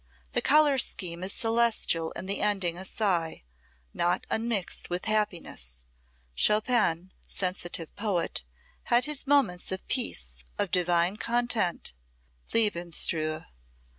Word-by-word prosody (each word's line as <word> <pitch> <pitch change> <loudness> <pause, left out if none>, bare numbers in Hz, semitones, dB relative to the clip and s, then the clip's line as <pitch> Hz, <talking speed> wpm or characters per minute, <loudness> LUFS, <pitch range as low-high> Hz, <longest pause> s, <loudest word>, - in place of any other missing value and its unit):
The - - 0
color 290 -2 +5
scheme 175 -6 -1
is 190 - +1
celestial 225 -9 +1
and 185 - -6
the 200 - 0
ending 190 -5 +1
a 185 +2 -6
sigh, 175 - 0 0.5
not 175 +1 0
unmixed 220 -5 -1
with 175 +1 -2
happiness. 170 - -2 0.4
Chopin, 205 - +1 0.2
sensitive 180 -3 -2
poet, 195 - -1 0.4
had 240 +1 +3
his 300 -2 -3
moments 245 -13 +2
of 190 - -4
peace, - - -2
of - - -1
divine 175 +1 +2
content 235 - 0 0.6
lebensruhe. 170 -6 +1
185 Hz, 110 wpm, -28 LUFS, 170-225 Hz, 0.6 s, color